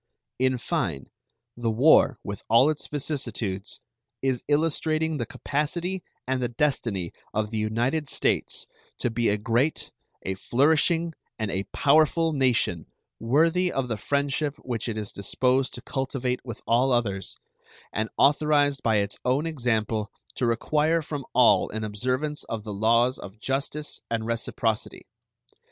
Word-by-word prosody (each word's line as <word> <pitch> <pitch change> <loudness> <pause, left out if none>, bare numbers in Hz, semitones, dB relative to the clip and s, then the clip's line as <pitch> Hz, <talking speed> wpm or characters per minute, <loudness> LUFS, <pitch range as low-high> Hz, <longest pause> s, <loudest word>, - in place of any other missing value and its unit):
In 130 0 +2
fine, 70 - -2 0.4
the 120 -1 -1
war, 130 +2 +5
with 100 0 -5
all 125 +7 +6
its 155 - -6
vicissitudes, 115 -9 -3 0.4
is 130 -2 0
illustrating 155 +1 +1
the 120 - -3
capacity 170 +6 -2 0.2
and 130 0 -1
the 125 - +1
destiny 115 - -1 0.2
of 105 0 0
the 110 - -1
United 120 +8 0
States - - 0 0.3
to 120 - -1
be 115 +1 +1
a 105 - +2
great, 120 +8 0 0.3
a 95 - -2
flourishing, 160 - +2 0.2
and 110 -3 -2
a 95 +1 -2
powerful 155 +2 +3
nation, 120 - +1 0.3
worthy 165 +9 +2
of 130 -2 -2
the 115 - 0
friendship 140 +5 -1
which 120 -1 -3
it 110 - -3
is 105 -2 -3
disposed 125 +6 +1
to 120 - -8
cultivate 130 -2 -2
with 115 -4 -7
all 125 +3 +3
others, 100 -6 -1 0.6
and 110 +1 -1
authorized 145 -1 +3
by 110 -1 +2
its 100 -1 0
own 130 +5 +1
example 115 -8 -1 0.2
to 125 - 0
require 155 +7 +1
from 145 -3 -5
all 115 -6 +5
an 110 +1 -4
observance 130 +8 -2
of 110 -2 -5
the 105 -1 -5
laws 115 +5 +3
of 100 +3 -10
justice 140 +4 -3
and 115 -1 -1
reciprocity. 115 -1 -2
125 Hz, 140 wpm, -26 LUFS, 110-145 Hz, 0.6 s, all